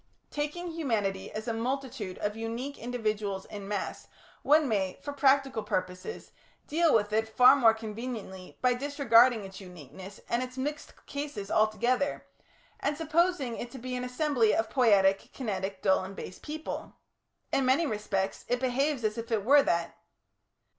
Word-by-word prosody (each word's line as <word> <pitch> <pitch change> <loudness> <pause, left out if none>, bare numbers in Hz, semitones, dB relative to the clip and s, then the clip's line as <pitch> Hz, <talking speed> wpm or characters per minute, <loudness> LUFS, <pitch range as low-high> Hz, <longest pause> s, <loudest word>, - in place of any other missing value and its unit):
Taking 300 +4 -3
humanity 210 -12 -2
as 215 +2 -6
a 230 - 0
multitude 240 -4 -3
of 205 0 -2
unique 230 +5 -5
individuals 215 -5 -2
in 205 -2 -8
mass, 205 -1 -4 0.3
one 300 +1 +4
may, 195 -5 0
for 285 - -6
practical 275 -3 +3
purposes, 185 - -4 0.3
deal 325 +1 +2
with 210 -1 +2
it 220 +1 +1
far 250 +4 +7
more 230 -5 +5
conveniently 220 -4 -7
by 250 0 +5
disregarding 245 -4 +4
its 190 +1 -10
uniquenesses 180 +2 -11
and 235 - 0
its 255 0 -6
mixed 290 +3 -5
cases 280 -9 -5
altogether, 240 +6 +1 0.5
and 290 +1 -1
supposing 320 -5 +1
it 240 - -5
to 265 - -10
be 255 +1 -5
an 250 - -3
assembly 250 -3 +2
of 225 0 -1
poietic, 200 -6 +3
kinetic, 195 -5 -4
dull, 190 -1 +3
and 190 +1 -8
base 185 - -8
people. 310 +1 -6 0.6
In 270 - +2
many 275 +6 +3
respects 210 -5 -2
it 245 - 0
behaves 260 +1 0
as 215 +1 0
if 230 +1 -7
it 210 -3 0
were 285 +3 +7
that. 170 -9 0
235 Hz, 155 wpm, -29 LUFS, 205-275 Hz, 0.6 s, far